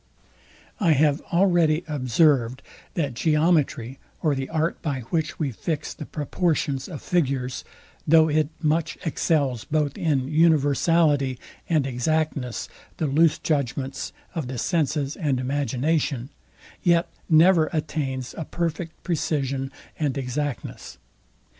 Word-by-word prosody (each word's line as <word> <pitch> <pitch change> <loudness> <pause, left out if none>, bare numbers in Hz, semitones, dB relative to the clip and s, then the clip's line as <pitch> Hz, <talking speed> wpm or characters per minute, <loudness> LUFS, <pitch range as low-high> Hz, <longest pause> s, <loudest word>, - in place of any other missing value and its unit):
I 170 -7 +4
have 145 +1 +3
already 170 -3 +3
observed, 130 -2 +2 0.3
that 145 -7 -1
geometry, 150 -3 +1 0.2
or 155 -3 +3
the 135 -1 -3
art, 160 +1 -1
by 140 -5 -2
which 160 -1 -1
we 145 -4 -1
fix 150 +6 -3
the 150 - -8
proportions 150 -3 -1
of 155 -6 -8
figures; 135 -7 0 0.4
though 160 +1 +6
it 155 -1 +1
much 155 +1 0
excels 140 -7 0
both 150 -2 -1
in 140 -5 +1
universality 150 -2 +3 0.3
and 155 -5 +2
exactness, 135 -1 -1 0.3
the 160 - -1
loose 150 +3 +3
judgments 135 -2 -2 0.2
of 160 -7 -3
the 130 0 -5
senses 150 -1 0
and 145 -8 0
imagination; 140 0 -1 0.5
yet 170 -1 +3 0.2
never 165 0 +5
attains 135 -5 -3
a 160 - -4
perfect 165 0 -4
precision 140 -5 -1 0.3
and 145 -3 0
exactness. 135 +1 -4
150 Hz, 115 wpm, -24 LUFS, 135-160 Hz, 0.5 s, though